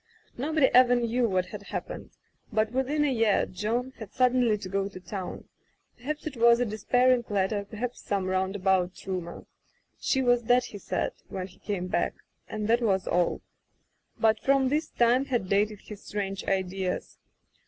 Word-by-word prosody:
Nobody 300 +3 +2
ever 245 0 +7
knew 240 0 +1
what 185 -1 +1
had 205 +2 -8
happened, 200 - -6 0.4
but 215 0 +1
within 265 +4 0
the 290 - +2
year 225 -4 +2
John 235 +7 -2
had 220 -4 -8
suddenly 250 -3 +3
to 200 -2 -7
go 195 +1 -1
to 190 - -10
town 185 0 -6 0.2
— - - -45
per 245 - -19
haps 305 +1 -3
it 305 -3 -4
was 235 0 +6
a 245 - +2
despairing 245 +3 +2
letter, 200 0 0
perhaps 235 +4 -5
some 200 -2 -1
roundabout 190 -1 0
rumor. 180 -3 -5 0.5
She 265 -1 +1
was 245 -1 +3
dead, 245 +2 +3
he 205 - -8
said, - - -2 0.2
when 185 -1 -4
he 185 - -16
came 200 -3 -3
back; 185 - -1 0.3
and 210 -1 -3
that 235 +2 +3
was 195 -5 +1
all. 175 0 +1 0.8
But 220 -1 +3
from 270 +1 +3
this 300 +3 0
time 245 +3 +3
had 245 -8 -1
dated 205 +1 +1
his 210 -2 -11
strange 195 -1 -4
ideas. 190 -1 -2
215 Hz, 175 wpm, -28 LUFS, 195-245 Hz, 0.8 s, ever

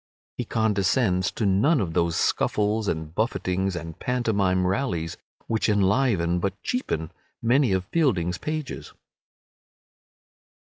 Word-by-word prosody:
He - - -3
condescends 100 -3 +1
to 110 - -2
none 105 - +3
of 90 -6 -2
those 85 0 +1
scuffles 105 +1 +1
and 80 -2 -3
buffetings 95 -3 -1
and 80 -2 -7
pantomime 100 -7 +1
rallies 90 -5 -1 0.3
which 110 0 0
enliven, 100 -4 +2
but 100 +2 -2
cheapen, 80 - -2 0.3
many 125 +1 +3
of 95 -1 0
Fielding's 95 - +1
pages. 155 -3 -5
100 Hz, 110 wpm, -25 LUFS, 90-115 Hz, 0.3 s, none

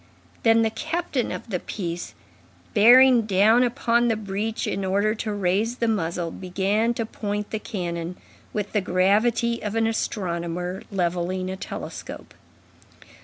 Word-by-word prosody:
Then 225 0 +4
the 220 - +1
captain 315 -3 -2
of 225 - -7
the 180 - 0
piece, 175 -3 -5 0.6
bearing 240 +1 +7
down 215 +4 +5
upon 240 -1 +2
the 225 - +2
breech 210 +1 -3
in 195 - -2
order 200 +3 +1
to 215 -1 -4
raise 205 +4 0
the 235 -2 -1
muzzle, 170 -5 -1
began 200 +6 0
to 230 - -2
point 205 -1 -4
the 220 - -2
cannon 175 -5 -4 0.3
with 205 -1 -3
the 210 - +1
gravity 215 +6 +2
of 210 +1 -4
an 225 0 +2
astronomer 180 -4 -2
levelling 185 0 -1
a - - -4
telescope. 190 - -7
205 Hz, 140 wpm, -24 LUFS, 185-225 Hz, 0.6 s, bearing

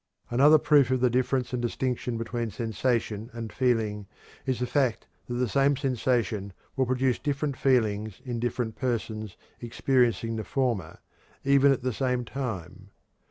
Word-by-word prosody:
Another 145 +6 +7
proof 145 -3 +4
of 130 0 +2
the 125 -1 +3
difference 125 +1 0
and 125 - -1
distinction 125 0 -2
between 115 0 -3
sensation 115 -1 -1
and 115 -2 -6
feeling 110 -5 0 0.4
is 130 -2 +1
the 125 - 0
fact 130 -3 0 0.2
that 120 - -3
the 125 0 +1
same 135 +6 +2
sensation 120 -6 0 0.2
will 130 -2 +1
produce 130 0 +1
different 145 -1 -1
feelings 110 -6 +1
in 120 -2 -3
different 120 -1 -2
persons 110 -4 -3 0.2
experiencing 120 -1 +1
the 110 - -3
former, 115 - -1 0.5
even 140 0 +5
at 135 - 0
the 130 -1 0
same 125 0 -1
time. 100 -7 -5
120 Hz, 150 wpm, -27 LUFS, 110-130 Hz, 0.5 s, Another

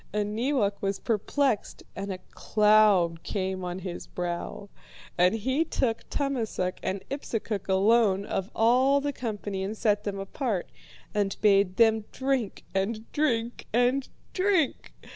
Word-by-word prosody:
And 210 0 -1
Neewak 225 -5 0
was 195 0 -1
perplexed 230 +2 -1
and 195 0 -4
a 185 - -4
cloud 210 -6 +4
came 190 -2 -3
on 180 0 -3
his 185 -2 -6
brow. 175 +3 -4 0.5
And 180 +4 +4
he 260 +8 +1
took 255 -7 -2
Tummasook 230 -10 -2
and 190 0 -3
Ipsukuk 225 -8 -3
alone 200 0 +3
of 195 -1 -3
all 255 +5 +4
the 285 0 -2
company 205 -6 -4
and 205 +3 -3
set 210 -1 +1
them 205 -2 -3
apart, 195 - -3 0.4
and 205 -2 0
bade 200 -3 +4
them 220 -2 +4
drink 260 -5 -1
and 215 +4 -2
drink 240 -6 -1
and 245 +3 +2 0.2
drink. 370 -6 +1
210 Hz, 135 wpm, -27 LUFS, 195-245 Hz, 0.5 s, cloud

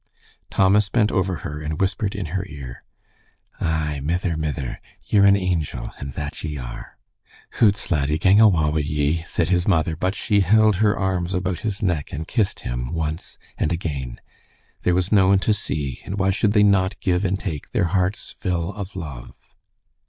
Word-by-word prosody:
Thomas 100 +2 +3
bent 110 0 +2
over 95 -2 0
her 75 +1 -5
and 75 +1 -4
whispered 100 +1 0
in 100 - -3
her 95 -1 -1
ear, 65 -4 -9 0.8
"Ay, 75 -2 -1
mither, 85 +2 -1
mither, 75 -4 -3 0.2
ye're 100 -1 +4
an 100 - +6
angel, 85 -10 -2
and 70 -1 -6
that 75 +1 -5
ye 75 -2 -4
are." - - -8 0.6
"Hoots, 105 -3 +3
laddie, 75 -1 +1
gang 95 +5 +5
awa 85 -9 +4
wi' 80 - 0
ye," 75 +2 0
said - - 0
his 90 -1 +2
mother, 80 -4 +2
but 95 +4 -1
she 105 -3 +1
held 105 +1 +4
her 105 0 +2
arms 95 -1 -1
about 90 -1 -1
his 105 -3 -3
neck 85 -7 -1
and 80 +3 -5
kissed 110 -5 0
him - - -4
once 80 0 -4 0.2
and 75 - +1
again. 70 -8 -4 0.6
There 90 - +2
was 90 +1 0
no 100 -3 +5
one 95 0 +5
to 110 - +4
see, 70 -10 -3
and 100 - -5
why 95 -1 +2
should 100 +1 +1
they 105 -1 +5
not 100 -1 +2
give 90 0 +1
and 95 0 +1
take 80 -9 -5
their - - +1
heart's 95 +2 0
fill 90 -1 -2
of 100 -2 -7
love. 75 -9 -7
90 Hz, 180 wpm, -22 LUFS, 75-100 Hz, 0.8 s, an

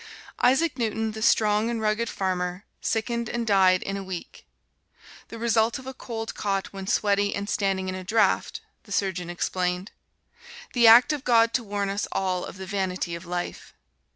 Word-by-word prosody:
Isaac 275 +2 +3
Newton, 220 -1 -1
the 220 0 -7
strong 215 0 +3
and 235 -1 -2
rugged 220 +1 0
farmer, 180 0 -2 0.2
sickened 235 +1 -1
and 235 -1 -2
died 190 -3 +4
in 195 0 -3
a 195 - -5
week. 185 -2 -8 0.8
"The 230 - -9
result 225 0 +2
of 260 - -11
a 265 - -6
cold 225 -3 -6
caught 195 -2 -2
when 195 -1 -7
sweaty 205 0 +1
and 200 0 -4
standing 195 -3 0
in 185 - -2
a 185 0 -6
draft," 220 - +1 0.2
the 205 - -15
surgeon 185 -3 -1
explained. 180 +2 -2 0.8
"The 235 -2 +5
act 240 +6 +8
of 290 -3 -4
God 230 -2 +4
to 250 - 0
warn 200 -1 -2
us 200 +1 -2
all 185 -2 -1
of - - -9
the 190 - -7
vanity 185 -2 -2
of 170 +1 -7
life." 175 0 -5
205 Hz, 180 wpm, -25 LUFS, 190-230 Hz, 0.8 s, act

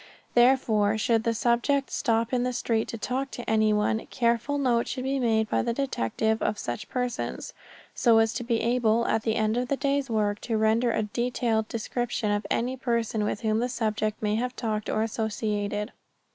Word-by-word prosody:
Therefore, 230 -4 +3
should 225 +1 +1
the 230 - +2
subject 240 +5 +1
stop 230 -2 0
in 250 - +2
the 250 0 -1
street 230 -2 0
to 230 - -5
talk 260 +4 -2
to 245 - -8
anyone, 215 0 +2
careful 235 +4 0
note 245 -4 +1
should 255 - -4
be 270 +1 -1
made 220 -3 +2
by - - +1
the 235 - -1
detective 220 - -1
of 210 - 0
such 120 -9 -5
persons, 250 -1 -3 0.4
so 230 -3 +4
as 225 0 +3
to - - -3
be 235 -1 0
able, 235 -1 +2
at 220 - +1
the 220 0 0
end 220 +1 +1
of 250 0 -1
the 280 - 0
day's 280 -1 0
work, 210 -2 0
to 225 -2 -1
render 220 +2 +2
a 220 - 0
detailed 230 0 -1
description 230 -1 -2
of 205 +1 -1
every 250 +3 -1
person 230 -4 -1
with 210 - -2
whom 220 -1 +1
the 245 +2 0
subject 215 -3 -1
may 210 0 +1
have 250 +3 -1
talked 215 -2 -2
or 215 - +1
associated. 210 -1 -2
230 Hz, 190 wpm, -27 LUFS, 215-245 Hz, 0.4 s, so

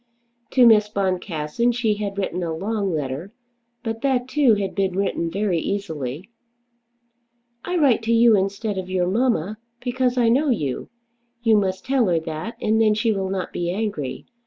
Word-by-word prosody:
To 255 -2 +6
Miss 215 -2 +6
Boncassen 185 +1 -1
she 230 -3 +1
had 205 -1 -4
written 185 -2 -2
a 165 -2 -2
long 200 +2 -2
letter, 150 +4 -3 0.5
but 225 -1 -4
that 255 -3 +1
too 260 -4 +4
had 200 -2 -3
been 190 -3 0
written 190 -4 -1
very 190 -1 0
easily. 160 - -4 1.3
"I 360 - -3
write 275 -8 +4
to 230 - +1
you 230 -1 +6
instead 200 +1 -1
of 185 0 -6
your 185 -1 +1
mamma, 215 -1 0 0.2
because 250 0 -1
I 240 -2 +3
know 275 +6 +3
you. 150 - -2 0.5
You 225 -2 +5
must 190 -2 0
tell 260 -4 +2
her 170 -2 +2
that, 160 +7 -6
and 220 +1 +2
then 215 -1 +4
she 225 +1 +1
will 195 -2 -2
not 190 -2 -3
be 175 0 -2
angry. 190 -8 -3
205 Hz, 170 wpm, -22 LUFS, 180-230 Hz, 1.3 s, To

